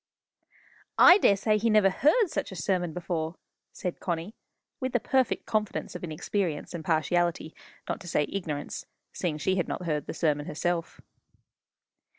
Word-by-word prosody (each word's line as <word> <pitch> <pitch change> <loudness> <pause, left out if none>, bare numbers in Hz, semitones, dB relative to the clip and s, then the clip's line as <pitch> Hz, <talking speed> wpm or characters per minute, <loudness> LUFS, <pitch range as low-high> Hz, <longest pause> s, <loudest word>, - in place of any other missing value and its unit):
"I 360 +3 +9
daresay 210 - +3
he 230 +2 +1
never 210 -3 +5
heard 355 - +3
such - - -3
a - - -7
sermon 175 +1 0
before!" 165 -1 -3 0.4
said 180 -2 -5
Connie, 175 +3 -3 0.5
with 260 -1 -3
the 245 - +3
perfect 260 +2 +1
confidence 215 -2 -2
of - - -7
inexperience 170 0 -2
and 170 -2 -5
partiality 165 +1 0 0.3
not - - -2
to 180 - -10
say 150 -2 +1
ignorance, 160 -7 -4 0.3
seeing 165 -5 -2
she 190 +5 0
had 180 - 0
not 180 - -4
heard 150 -3 -1
the - - -5
sermon 150 -3 0
herself. 170 +2 -2
175 Hz, 155 wpm, -28 LUFS, 160-205 Hz, 0.5 s, I